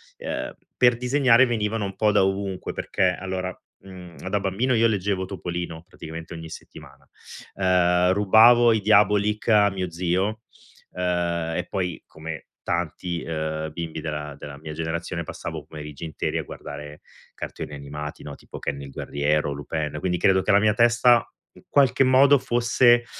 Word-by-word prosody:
ehm, - - -5 0.2
per 125 -1 +4
disegnare 125 0 +4
venivano 110 -2 -1
un 95 - -6
po' 105 -1 +2
da 105 -2 +4
ovunque 95 -1 -3
perché 90 -1 0
allora, 95 -1 -4 0.3
ehm, 90 -2 -11
da 100 +1 +1
bambino 105 +7 0
io 115 +1 +4
leggevo 100 -2 -1
Topolino 85 -3 -5
praticamente 80 -1 -9
ogni 80 -1 -8
settimana. - - -13 0.5
Ehm, 90 -1 +3
rubavo 115 +4 +6
i 110 - 0
Diabolik 105 +1 +3
a 105 -2 +5
mio 95 -2 -3
zio, 95 +6 -1 0.5
ehm, 85 -2 -1
e 90 - -2
poi 90 -3 -3
come 80 -1 -8
tanti, 85 0 -3
ehm, 80 -1 -3
bimbi 80 -1 -5
della 75 -2 -5
della 70 -1 -9
mia 80 0 -7
generazione, 85 +2 -3
passavo 80 0 -6
i 70 - -15
pomeriggi 75 -1 -9
interi 80 -1 -3
a - - -2
guardare 75 +2 -9 0.3
cartoni 75 - -7
animati, 75 +1 -7
no, 70 -1 -8
tipo - - -11
Ken 70 0 -4
il 70 - -8
guerriero, 75 +2 -1
Lupin. 75 +1 -4
Quindi, 90 0 -1
credo 95 +2 +3
che - - +1
la 100 - +6
mia 105 0 +3
testa 120 +1 +4 0.3
in - - -18
qualche 135 -1 +4
modo 135 +2 +6
fosse, 120 0 +3
90 Hz, 160 wpm, -24 LUFS, 80-105 Hz, 0.5 s, rubavo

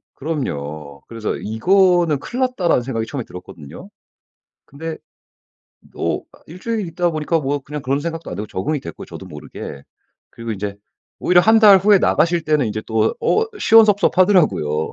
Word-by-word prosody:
그럼요. 75 - -5
그래서 115 -2 -4
'이거는 175 - +2
큰일 245 - -6
났다.'라는 195 - +1
생각이 115 -3 -3
처음에 135 -5 -5
들었거든요. 85 -5 -11 0.7
근데 160 +3 -7 1.0
또 - - -2
아 - - -20
1 170 +4 -11
주일 225 -3 -2
있다 175 +1 -1
보니까 155 +1 -1
뭐 140 0 -2
그냥 150 +2 -7
그런 135 +2 -1
생각도 165 +1 -5
안 - - -5
들고 105 - -5
적응이 140 +10 -2
됐고 85 - -9
저도 - - -10
모르게 70 - -9 0.5
그리고 115 -1 -6
인제 100 0 -5 0.4
오히려 175 0 +4
1 220 +3 +5
달 205 -3 +8
후에 200 +1 +5
나가실 170 -2 +2
때는 150 -5 +1
이제 110 0 -4
또 110 0 +1
어 440 +1 +1
시원섭섭하더라고요. 185 - +3
150 Hz, 350 characters per minute, -19 LUFS, 110-180 Hz, 1.0 s, 달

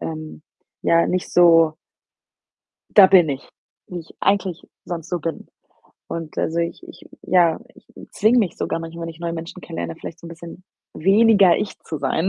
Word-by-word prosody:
ähm, 155 -1 -7 0.4
ja, 170 0 +3
nicht 185 0 -2
so 165 -3 +5 1.2
„da 195 -2 +10
bin 180 -5 +5
ich“, 135 -1 -5 0.4
wie 180 - -6
ich 165 - -15
eigentlich 195 -3 0 0.2
sonst 170 -3 -6
so 175 - -2
bin 165 0 -5 0.6
und 165 -2 -6
also, 165 - -1
ich 170 0 -2
ich - - -14 0.2
ja, 170 -3 +3 0.2
ich - - -20 0.3
zwinge 220 +4 +3
mich 205 -7 0
sogar - - -2
manchmal, 165 0 -8
wenn 165 - -4
ich 160 -1 -10
neue 170 0 -4
Menschen 165 +2 -7
kennenlerne, 85 - -6
vielleicht 165 - -9
so - - -11
'n - - -8
bisschen 170 +2 -11 0.3
weniger 200 0 +4
ich 210 - -4
zu 155 - -6
sein. 140 +6 0
170 Hz, 175 wpm, -21 LUFS, 160-185 Hz, 1.2 s, da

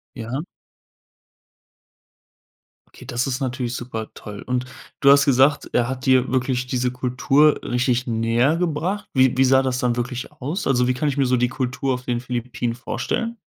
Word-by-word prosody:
Ja. 125 +4 -4 2.5
Okay, - - -15
das 120 +1 -1
ist 130 +1 -2
natürlich 125 -2 -3
super 115 -3 -5
toll. 105 -1 -9
Und 125 0 -1 0.3
du 140 0 +6
hast 140 0 +6
gesagt, 140 +2 +3
er 120 0 +2
hat 130 +1 -5
dir 130 -1 +4
wirklich 125 -1 0
diese 125 0 0
Kultur 130 +4 +2
richtig 125 0 0
näher 115 +6 +1
gebracht. 175 +4 -2
Wie 130 -2 +4
wie 135 - +5
sah 130 +1 +5
das 130 -1 -1
dann 120 -1 +1
wirklich 125 +1 -4
aus? 150 +8 -4
Also, 125 -2 +2
wie 125 - +2
kann 145 +4 -2
ich 140 - -3
mir 135 - +3
so 125 0 +2
die 125 - +2
Kultur 130 0 -2
auf 125 - -5
den 120 -1 -1
Philippinen 120 -1 -3
vorstellen? 230 - -3
125 Hz, 175 wpm, -22 LUFS, 125-135 Hz, 2.5 s, du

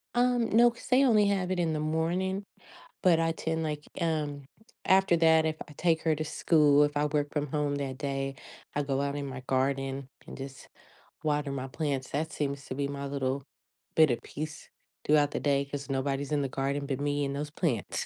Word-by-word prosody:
Um, 245 -1 +3
no, 235 +2 +6
'cause 235 - -13
they 260 +2 +5
only 210 -4 +5
have 190 -2 0
it 180 - 0
in 165 -2 +1
the 155 - -1
morning. 175 +5 -1 0.6
But 175 -3 +5
I 165 0 +2
tend 160 0 -2
like 150 -1 -3 0.2
um, 150 -4 -1 0.4
after 190 -2 +4
that, 160 -1 +5
if 155 0 -1
I - - -11
take 165 -2 +2
her 160 -1 +2
to 155 +1 -3
school, 150 -2 +4
if 145 0 -2
I 150 +1 +2
work 145 -1 -1
from 150 -1 -1
home 145 -1 0
that 135 -2 -4
day, 135 -1 -2 0.4
I 145 - +1
go 135 -1 -1
out 140 0 -1
in 140 -1 -3
my 130 -1 -6
garden, 135 0 0 0.2
and - - -9
just 135 -1 -9 0.6
water 145 -2 0
my 135 -1 -4
plants, 140 -2 -2
that 160 +3 -2
seems 140 -2 -3
to 130 - -5
be 140 0 -1
my 140 0 -5
little 140 -1 -2 0.5
bit 155 -3 +6
of 120 - -1
peace 150 +1 -7 0.4
throughout 145 -1 +4
the - - -2
day, 140 -1 +1
'cause 140 0 -6
nobody's 135 +1 -1
in 145 -1 +2
the 135 - -1
garden 140 +1 -2
but 135 -1 -2
me 145 0 0
and 140 0 -3
those 145 +1 -4
plants. 145 - -1
145 Hz, 210 wpm, -29 LUFS, 140-160 Hz, 0.6 s, no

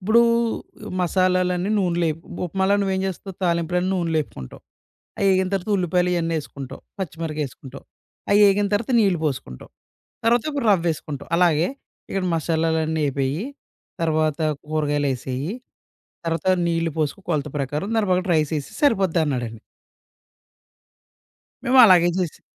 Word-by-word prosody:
ఇప్పుడు 220 +5 +4 0.8
మసాలాలన్నీ 185 +1 +1
నూనెలో 175 -3 +1
ఏపు 165 +3 -14 0.2
ఉప్మాాల 190 +3 0
నువ్వేం 190 -1 0
జేస్తావు 190 +1 -6
తాలింపులన్నీ 175 +1 0
నూనెలో 165 -3 0
ఎపుకుంటావు. 65 - -11 0.6
అయి 200 - +3
ఏగింతర్వాత 190 +1 0
ఉల్లిపాయలు 180 0 +1
ఇయన్నీ 165 -1 0
ఎసుకుంటావు. 140 -2 -9 0.2
పచ్చిమిరగాయేసుకుంటాం. 150 -6 -5 0.5
అయ్యేగింతర్వాత 205 +2 +3
నీళ్ళు 195 -6 +2
పోసుకుంటాం. 130 - -4 0.6
తర్వాత 235 0 +4
ఒక 285 -1 -2
రవ్వేసుకుంటావు. 165 -6 -1
అలాగే. 170 -2 +3 0.4
ఇక్కడ 195 - -2
మసాలాలన్నీ 160 -1 0
అయిపోయి. 140 +5 -1 0.6
తర్వాత 155 -1 +1 0.3
కూరగాయలెసేయి. 145 -1 -1 0.7
తర్వాత 165 +2 -2 0.2
నీళ్ళు 165 -1 0
పోసుకొ 155 +5 -1
కొలత 150 -2 -1
ప్రకారం. 145 - -2
దాని 215 -2 +1
ప్రకారం 180 +1 +1
రైస్ 155 -2 +1
ఎసెసేయి 140 - -11
సరిపోద్దన్నాడండి. 160 - +1 2.0
మేము 260 +1 +4
అలాగే 175 -4 +6
చేసాం. 180 -4 -3
170 Hz, 110 wpm, -23 LUFS, 155-190 Hz, 2.0 s, అలాగే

